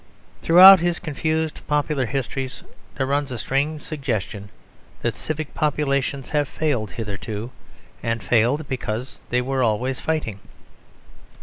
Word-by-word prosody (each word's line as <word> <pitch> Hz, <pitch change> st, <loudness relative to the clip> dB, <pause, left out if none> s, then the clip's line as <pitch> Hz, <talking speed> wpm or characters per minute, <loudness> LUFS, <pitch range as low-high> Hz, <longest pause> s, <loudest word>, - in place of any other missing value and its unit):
Throughout 185 Hz, +3 st, +9 dB
his 175 Hz, 0 st, 0 dB
confused 160 Hz, 0 st, -2 dB
popular 150 Hz, -3 st, 0 dB
histories, 135 Hz, +1 st, -4 dB, 0.3 s
there 135 Hz, -, 0 dB
runs 140 Hz, 0 st, -1 dB
a 125 Hz, -, -4 dB
strange 145 Hz, +6 st, -1 dB
suggestion 110 Hz, -, -4 dB, 0.5 s
that -, -, 0 dB
civic 155 Hz, -1 st, -4 dB
populations 140 Hz, -3 st, -1 dB
have 145 Hz, -2 st, +1 dB
failed 130 Hz, -10 st, -1 dB
hitherto, 110 Hz, +1 st, -5 dB, 0.5 s
and 115 Hz, -2 st, -2 dB
failed 125 Hz, +8 st, +2 dB
because 125 Hz, -1 st, -4 dB
they 125 Hz, +1 st, +1 dB
were 135 Hz, +1 st, -1 dB
always 125 Hz, +3 st, 0 dB
fighting. 150 Hz, -11 st, -2 dB
135 Hz, 120 wpm, -22 LUFS, 120-150 Hz, 0.5 s, Throughout